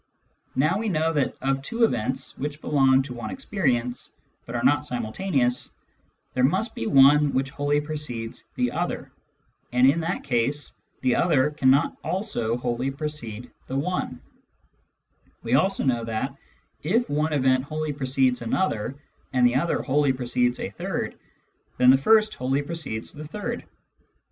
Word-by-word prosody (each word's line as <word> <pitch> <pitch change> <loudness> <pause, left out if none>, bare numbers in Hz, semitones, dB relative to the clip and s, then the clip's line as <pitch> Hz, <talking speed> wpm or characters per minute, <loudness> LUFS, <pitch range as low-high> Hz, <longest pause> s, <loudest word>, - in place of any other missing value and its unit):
Now 155 +9 +2
we 225 0 -1
know 160 -2 +1
that 145 -4 0
of 135 0 +1
two 230 - -1
events 130 - +1
which 145 +1 -4
are 140 -3 +3 1.8
not 145 +1 +3
simultaneous, 125 - 0 0.6
there 125 - +1
must 190 - +2
be 115 - -4
one 140 +1 +6
which 135 +1 0
wholly 145 +1 +1
precedes 130 -6 -5
the 125 -1 0
other, - - -3 0.6
and 125 +1 +4
in 140 +5 +4
th^t 165 +2 -2
case 135 +3 0 0.3
the 130 -2 +2
other 150 -4 +3
cannot 140 0 +3
also 180 - -1
wholly 125 +2 -1
precede 135 -5 -5 0.2
the 135 - -2
one; 145 -5 -2 1.2
we 115 - -2
also 190 +8 +3
know 120 -3 +1
that, 115 +4 -3 0.5
if 225 +10 +1
one 150 +2 0
event 130 -3 +2
wholly 155 0 -3
precedes 130 -2 +1
another, 120 - -1 0.4
and 125 -1 +4
the 120 - +4
other 150 +7 0
wholly 145 -1 +2
precedes 125 -1 0
a - - -4
third, - - -3 0.6
then 125 0 +7
the 135 - +6
first 215 +8 +4
wholly 135 +3 -1
precedes 145 -8 -4
the 150 0 -8
third. 205 +7 -5
135 Hz, 140 wpm, -25 LUFS, 125-155 Hz, 1.8 s, then